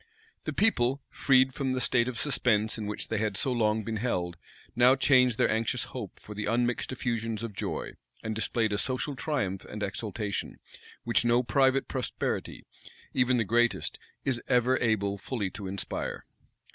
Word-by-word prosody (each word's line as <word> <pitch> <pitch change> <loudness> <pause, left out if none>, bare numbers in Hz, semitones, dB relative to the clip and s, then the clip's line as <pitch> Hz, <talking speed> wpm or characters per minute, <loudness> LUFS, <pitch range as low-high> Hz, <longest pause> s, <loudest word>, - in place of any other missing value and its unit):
The - - -1
people, 135 - +2
freed 130 -1 +4
from 135 -1 -1
the 130 - 0
state 120 -1 +2
of 125 -2 -3
suspense 115 -6 +2
in 105 - -3
which 105 - -4
they 110 - 0
had 105 -2 -1
so 135 - +1
long 110 -2 +1
been 110 +1 -3
held, 90 -7 -1 0.4
now 125 +2 +6
changed 125 -3 +4
their - - +3
anxious 115 +2 0
hope 115 -8 -7
for 105 - -9
the 105 0 -3
unmixed 120 +3 0
effusions 115 -3 -2
of 115 -3 -4
joy; - - -3 0.3
and 110 - -2
displayed 110 0 0
a 105 - 0
social 135 +2 -1
triumph 120 -9 -2
and 105 0 -6
exultation, 105 0 -3 0.5
which 115 -3 +2
no 120 +1 +3
private 135 +3 +3
prosperity, 130 -2 -3 0.5
even 125 0 +3
the 115 - +2
greatest, 120 +3 +1 0.3
is 125 -3 0
ever 125 +1 +3
able 100 -3 +1
fully 100 -3 -3
to 100 -2 -6
inspire. 95 0 -4
120 Hz, 170 wpm, -29 LUFS, 105-130 Hz, 0.5 s, now